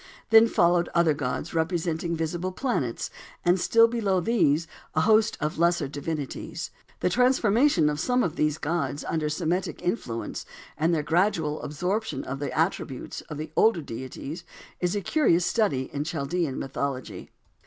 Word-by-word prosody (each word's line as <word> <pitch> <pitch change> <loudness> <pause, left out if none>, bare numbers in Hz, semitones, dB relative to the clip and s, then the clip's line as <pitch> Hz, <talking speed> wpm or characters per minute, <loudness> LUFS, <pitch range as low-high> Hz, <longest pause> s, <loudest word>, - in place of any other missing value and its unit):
Then 225 +1 +8
followed 175 -4 +3
other 170 -2 +4
gods, 145 +2 -3
representing 165 0 -1
visible 170 +3 -2
planets, 185 - -2 0.3
and 175 +2 +4
still 230 +5 +5
below 210 -5 +1
these 170 -7 +2 0.3
a 155 - +3
host 215 +3 +4
of 150 +1 -2
lesser 170 -1 +3
nature 135 - -8
divinities. 145 -1 -5 0.3
The - - +2
transformation 245 - +3
of 150 0 -1
some 250 +7 +2
of 165 -2 -2
these 150 -2 +1
gods 145 -3 -2
under 155 -2 -1
Semitic 175 +4 -1
influences, 125 - -3 0.3
and 160 +2 +1
their 160 -3 +1
gradual 160 -2 +1
absorption 180 0 -2
of 135 +1 -5
the 145 - -3
attributes 155 -5 -2
of 150 - -5
the 155 0 -6
older 215 -8 +4
deities 135 +6 -7 0.4
is 180 +2 0
a 205 - -1
curious 180 - +2
study 140 - 0
in 145 - -1
Chaldean 160 -1 -2
mythology. 135 -1 -4
165 Hz, 155 wpm, -26 LUFS, 150-190 Hz, 0.4 s, Then